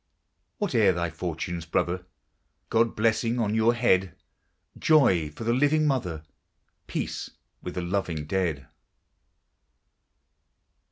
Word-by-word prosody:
Whate'er 115 - +3
thy 85 -1 -2
fortunes, 85 0 -4
brother! 90 +2 -1 0.6
God's 115 0 +2
blessing 115 +2 +1
on 110 -3 0
your 110 +2 +3
head; 95 -7 +2 0.6
Joy 95 - +4
for 75 - -9
the 115 +1 +1
living 145 +4 +3
mother, 90 - -1 0.6
Peace - - -4 0.3
with 90 - -6
the 90 - -2
loving 85 -4 -2
dead. 80 -6 -1
95 Hz, 105 wpm, -26 LUFS, 85-115 Hz, 0.6 s, Joy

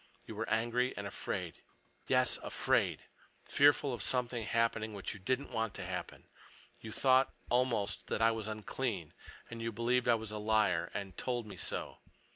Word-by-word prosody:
You - - -7
were 115 +2 -3
angry 120 +3 +1
and - - -4
afraid. - - -4 0.5
Yes, - - +3
afraid—fearful 145 -1 +1
of 120 - -4
something 120 0 0
happening 110 -2 +1
which 100 - -3
you 100 - -10
didn't 130 +8 -1
want 115 -3 -1
to - - -4
happen. - - -5 0.6
You 110 - -8
thought, 130 +3 +4 0.2
almost, 120 -5 +1
that - - -1
I 115 0 +5
was 110 -1 -3
unclean. 110 - -3 0.4
And 115 -1 -6
you 115 0 -1
believed 120 +3 +1
I 120 - +6
was 110 -1 -5
a 105 - -4
liar, 105 -5 +2
and 95 -2 -4
told 120 -2 -2
me 105 - -9
so. - - -4
115 Hz, 165 wpm, -34 LUFS, 105-125 Hz, 0.6 s, I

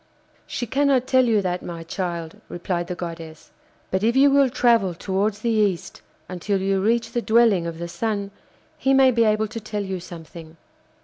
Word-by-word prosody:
'She 245 - -3
cannot 270 +1 +2
tell 260 -1 +3
you 220 -4 +2
that, 180 -1 -2
my 170 -1 -7
child,' 170 -1 -5
replied 175 0 -3
the 180 - -4
goddess, 165 -2 -8 0.4
'but, 190 - 0
if 230 +2 +2
you 275 +1 +6
will 275 -1 +4
travel 230 -7 +2
towards 200 +4 -1
the 235 - 0
East 205 -5 0 0.3
until 190 +2 -2
you 195 0 0
reach 230 +3 +1
the 240 - -1
dwelling 220 -7 +3
of 165 -1 -6
the 170 +1 -5
Sun, 200 +3 -3 0.5
he 270 +1 +3
may 265 -1 +6
be 230 -1 +2
able 215 0 +2
to 230 +2 -6
tell 210 -1 -4
you 190 -1 -4
something. 165 -2 -11
200 Hz, 185 wpm, -23 LUFS, 175-235 Hz, 0.5 s, you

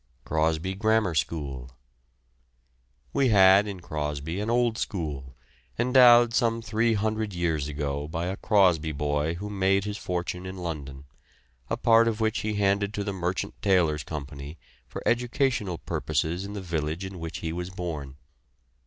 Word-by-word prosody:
CROSBY 80 +3 0
GRAMMAR 110 -2 +1
SCHOOL. 70 -3 -3 1.4
We 140 -2 +3
had 95 -1 +6
in 95 -3 -6
Crosby 75 +2 -4
an 105 +2 -2
old 120 -1 +1
school, 70 -8 -4 0.4
endowed 120 -1 +6
some 115 -2 +2
three 110 +2 +1
hundred 110 -1 -1
years 80 -5 -1
ago 70 -1 -3
by 85 +2 -3
a 95 +2 -2
Crosby 90 -8 +2
boy 75 +2 -1
who 100 +4 -6
made 95 -1 +1
his 105 0 -4
fortune 90 +1 -3
in 95 0 -7
London, 70 -6 -6 0.7
a - - -1
part 115 0 +5
of 115 -1 -1
which 110 -1 +1
he 105 0 -2
handed 100 +1 +1
to 100 - -2
the 100 -1 -3
Merchant 90 0 -2
Taylors' 90 -7 +2
Company 70 0 -7 0.3
for - - -7
educational 120 -6 0
purposes 85 +4 -2
in 100 - -7
the 100 - -5
village 80 0 -3
in 95 -1 -8
which 80 0 -5
he 80 - -2
was 90 +1 -4
born. 80 -7 -5
90 Hz, 155 wpm, -27 LUFS, 80-105 Hz, 1.4 s, had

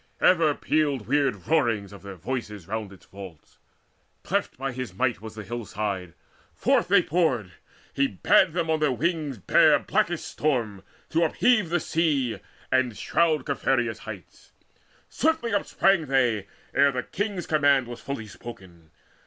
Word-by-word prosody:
Ever 165 -5 +4
pealed 145 -7 0
Weird 135 -8 +1
roarings 115 -10 +1
of 100 - -11
their 100 -1 -9
voices 105 -1 -5
round 110 -1 -4
its 95 - -16
vaults. 95 -5 -12 0.6
Cleft - - -1
by 135 +1 -3
his 125 -6 -6
might 120 +1 0
was 110 -1 -9
the 105 - -7
hill 120 +1 -5
side; 95 -4 -4 0.4
forth - - +2
they 180 -1 +5
poured. 145 - 0 0.4
He 140 0 +2
bade 135 - +3
them 170 -1 -1
on 160 - +1
their 150 -3 +2
wings 155 -1 -1
bear 95 - +5
blackest - - -1
storm 115 -10 -1 0.3
To 165 +1 +2
upheave 215 +3 +2
the 175 +1 +1
sea, 150 -8 0 0.3
and 130 -4 +1
shroud 155 -5 +1
Caphereus' 120 -5 0
heights. 105 -5 -11 0.5
Swiftly 315 -8 0
upsprang 195 -4 +2
they, 120 -7 +1 0.3
ere 140 0 +4
their 125 -1 -3
king's 200 -3 -3
command 145 -4 +3
Was 120 0 -8
fully 140 -5 -5
spoken. 95 -7 -12
130 Hz, 150 wpm, -26 LUFS, 105-155 Hz, 0.6 s, they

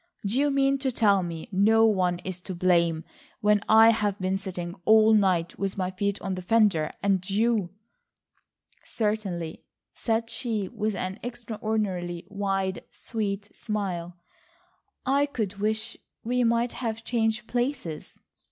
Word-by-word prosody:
Do 220 +6 +1
you 290 +1 +3
mean 275 0 +2
to 265 -1 0
tell 205 -5 +3
me 170 0 -5
no 220 +4 +5
one 185 -5 +2
is 185 -1 -4
to 185 0 -7
blame 170 -2 +2 0.4
when 210 -1 +4
I 225 +1 +8
have 205 -3 0
been 185 0 0
sitting 180 -3 -5
all 220 +2 +6
night 185 -5 +2
with 195 0 -2
my 185 -1 -1
feet 200 +2 -1
on 195 - -2
the 185 - -4
fender, 190 -6 +3
and 195 -2 +2
you—" 215 -2 +1 1.1
"Certainly," 200 -7 -3 0.3
said 230 0 -1
she 225 -5 -2
with 215 -1 -2
an 185 +2 -4
extraordinarily 215 -7 -3
wide, 195 -2 -2
sweet 205 -2 -4
smile, 185 -6 -3 0.9
"I 280 +2 +3
could 215 -8 -3
wish 220 +2 -1 0.3
we 250 +2 +1
might 235 +1 +2
have 230 -2 -4
changed 225 -1 0
places." 245 - -3
205 Hz, 140 wpm, -27 LUFS, 185-225 Hz, 1.1 s, I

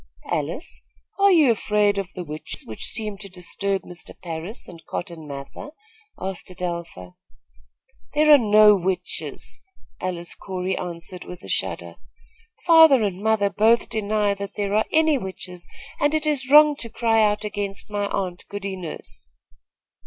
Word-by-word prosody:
"Alice, 160 - -3 0.4
are 400 0 +6
you 310 -8 +6
afraid 210 -2 +1
of 195 -1 -5
the 180 - -4
witches, 155 -1 -6
which 110 - -5
seem 210 -3 -2
to 200 -1 -9
disturb 190 +2 -3
Mr. 175 0 -11
Parris 170 +6 -6
and 170 -2 -12
Cotton 170 -3 -6
Mather?" 140 - -8 0.5
asked 190 -1 -5
Adelpha. 170 - -6 1.0
"There 305 +1 +5
are 290 - +9
no 210 -2 +6
witches," 190 0 -3 0.4
Alice 175 -2 -3
Corey 185 -1 -3
answered 175 0 -6
with 180 +1 -10
a - - -10
shudder. - - -3 0.7
"Father 320 -7 +7
and 195 -2 -2
mother 215 -2 +2
both 220 +4 +3
deny 210 -2 0
that 200 0 -7
there 200 -1 -2
are 215 - +3
any 315 -3 +3
witches, 185 -3 -7 0.3
and 290 +1 +2
it 310 0 -1
is 280 -4 0
wrong 300 +1 +8
to 230 - -6
cry 225 -1 +2
out 210 0 +2
against 205 -1 -5
my 205 -1 -1
aunt, 180 -3 -3
Goody 200 -1 -4
Nurse." 165 - -9
200 Hz, 150 wpm, -23 LUFS, 180-225 Hz, 1.0 s, are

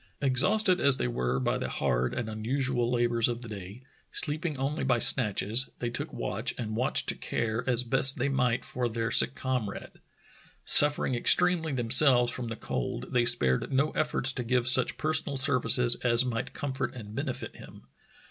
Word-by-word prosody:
Exhausted 180 - +1
as 140 -2 +5
they - - -2
were 60 +1 -3
by 65 - -2
the - - -5
hard 60 +1 -2
and 120 - -4
unusual 120 +3 -3
labors 120 -1 0
of 120 0 -5
the - - -10
day, 100 +3 -10 0.3
sleeping 150 0 -2
only 140 +4 -3
by 130 -2 +1
snatches, 115 +1 +3
they 120 -1 -5
took 120 - -6
watch - - -4
and 110 -2 -5
watch 125 +4 +1
to - - -1
care 115 0 -4
as 125 0 +1
best 135 +2 +1
they 135 +2 -1
might 125 -3 -1
for 125 -1 -4
their 115 0 -4
sick 130 - +1
comrade. 125 -6 -5 0.7
Suffering 145 -2 +4
extremely 165 +6 +2
themselves 125 0 +3
from 125 -2 -6
the 115 - -6
cold, 125 +2 -6
they 120 -1 +1
spared 65 - +2
no 140 +3 0
efforts 150 -3 -1
to 125 - -5
give 125 +1 -1
such 130 -1 +5
personal 155 -2 -1
services 125 -3 +4
as 120 0 +3
might 115 -2 -4
comfort 135 -4 -5
and 105 -4 -10
benefit 135 +1 -6
him. - - -14
125 Hz, 175 wpm, -27 LUFS, 115-135 Hz, 0.7 s, as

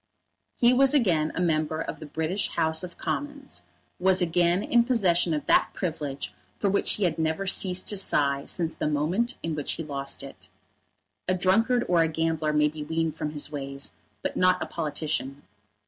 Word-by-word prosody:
He 240 +1 +5
was 270 +2 +4
again 170 - +2
a - - -2
member 155 -2 0
of - - -5
the 155 - -8
British 160 +6 -1
House 160 0 +1
of 180 -1 -8
Commons, 290 -1 -4 0.4
was 185 0 +3
again 175 +2 +2
in 235 0 +4
possession 185 -9 +2
of 150 -2 -1
that - - +4
privilege 150 -6 -4 0.2
for 200 - +1
which 200 - +3
he 210 - -2
had 175 -2 0
never 160 +4 0
ceased 185 -1 +1
to 205 - +1
sigh 140 -7 +2
since 165 -2 -1
the - - -2
moment 170 - 0
in 165 - -2
which 150 -1 -1
he 165 - -5
lost 140 -2 -5
it. - - -12 0.8
A 185 - +2
drunkard 225 +7 +2
or 175 -2 +3
a 165 - +3
gambler 160 -1 -1
may 150 0 +3
be 150 0 -5
weaned 160 0 -1
from 150 - -3
his 150 0 -5
ways, 140 -1 -5 0.3
but - - -2
not 185 0 +3
a - - -2
politician. 145 -3 -3
165 Hz, 185 wpm, -26 LUFS, 150-190 Hz, 0.8 s, He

